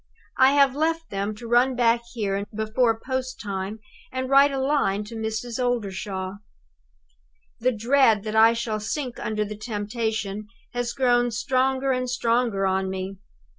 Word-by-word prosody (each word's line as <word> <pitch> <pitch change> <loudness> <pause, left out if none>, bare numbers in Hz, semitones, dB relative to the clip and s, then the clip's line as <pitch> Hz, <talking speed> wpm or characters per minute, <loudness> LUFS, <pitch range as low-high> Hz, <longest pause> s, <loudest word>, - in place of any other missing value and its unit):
I 265 +1 +6
have 275 -2 +4
left 325 +2 -1
them 200 +2 -2
to 235 +2 -9
run 245 +2 +3
back 235 -1 +3
here 200 -3 -1
before 225 +1 +1
post 260 +1 -4
time 195 0 -4 0.3
and 260 +1 -3
write 280 +1 +6
a 275 - -2
line 265 -8 +1
to 220 +2 -9
Mrs. 225 +3 -3
Oldershaw. 195 -5 -2 1.2
"The 255 +2 +2
dread 230 -2 +3
that 215 0 -4
I 225 +1 +7
shall 230 -2 -2
sink 250 +4 -4
under 215 -1 -1
the 210 +1 -6
temptation 215 -1 -3 0.3
has 245 -1 -2
grown 245 -2 +3
stronger 265 +3 +1
and 255 -1 -1
stronger 230 -4 +1
on 190 0 0
me. 190 +1 -5
230 Hz, 150 wpm, -24 LUFS, 210-255 Hz, 1.2 s, I